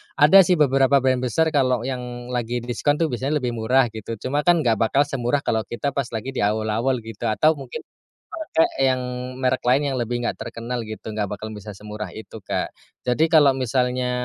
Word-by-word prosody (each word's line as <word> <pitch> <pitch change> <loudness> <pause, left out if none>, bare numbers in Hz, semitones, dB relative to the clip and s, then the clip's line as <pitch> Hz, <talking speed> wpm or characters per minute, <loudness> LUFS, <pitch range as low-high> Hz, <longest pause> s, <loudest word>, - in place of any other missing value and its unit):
Ada 150 +7 +7
sih 180 - +4
beberapa 135 -2 +4
brand 130 -1 +2
besar 160 +6 +1
kalau 130 -5 +1
yang 125 -1 -5
lagi 120 -1 -2
diskon 125 +4 0
tuh 160 -4 +1
biasanya 135 +5 -1
lebih 125 - 0
murah 120 +2 +2
gitu, 110 +1 -6
cuma 145 +8 -2
kan 170 -2 +5
nggak 115 -4 +2
bakal 125 +5 +3
semurah 140 -1 -1
kalau 110 - +1
kita 140 +4 -2
pas 140 -2 -2
lagi 120 +5 -4
di - - -2
awul-awul 110 +4 0
gitu, 115 +1 -5
atau 135 +8 +3
mungkin 130 -2 -7 0.4
pakai 315 - 0 0.2
yang 130 -1 0 0.4
merek 130 0 0
lain 130 +4 +4
yang - - -2
lebih 120 +1 -2
nggak - - -1
terkenal 120 +1 -5
gitu, 110 0 -9
nggak 105 -2 -2
bakal 105 +1 -5
bisa 105 0 -8
semurah 105 -2 -7
itu, 110 +1 -10
Kak. - - -3 0.3
Jadi 155 +6 +2
kalau 145 -5 +6
misalnya, 125 0 0
125 Hz, 195 wpm, -22 LUFS, 115-140 Hz, 0.4 s, Ada